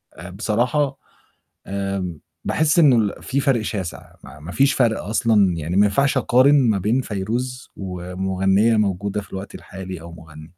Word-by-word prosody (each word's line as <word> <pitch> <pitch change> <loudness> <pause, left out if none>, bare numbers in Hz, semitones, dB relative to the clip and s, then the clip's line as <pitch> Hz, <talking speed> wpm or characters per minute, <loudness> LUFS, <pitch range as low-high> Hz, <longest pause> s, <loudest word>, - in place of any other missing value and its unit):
آآ 90 +3 -9
بصراحة 120 +7 0 0.7
آمم 95 -4 -3 0.3
باحس 155 +1 +1
إن 150 -5 +7
ال 110 -4 +1
في 140 +2 -1
فرق 135 -6 +1
شاسِع 95 -5 -5
ما - - -12
ما 80 +4 -8
فيش 140 +4 +3
فرق 115 -4 +1
أصلًا، 105 -4 +2
يعني 80 +3 -3
ما 105 - +5
ينفعش 140 +8 +1
أقارن 130 +3 +4 0.2
ما 100 - +1
بين 110 +7 +1
فيروز 125 +4 -4
ومغنيّة 95 +3 0
موجودة 100 0 -1
في 100 - -14
الوقت 95 +1 -7
الحالي 95 -2 -8
أو 85 0 -10
مغنّي. 80 -2 -12
100 Hz, 160 wpm, -21 LUFS, 95-120 Hz, 0.7 s, إن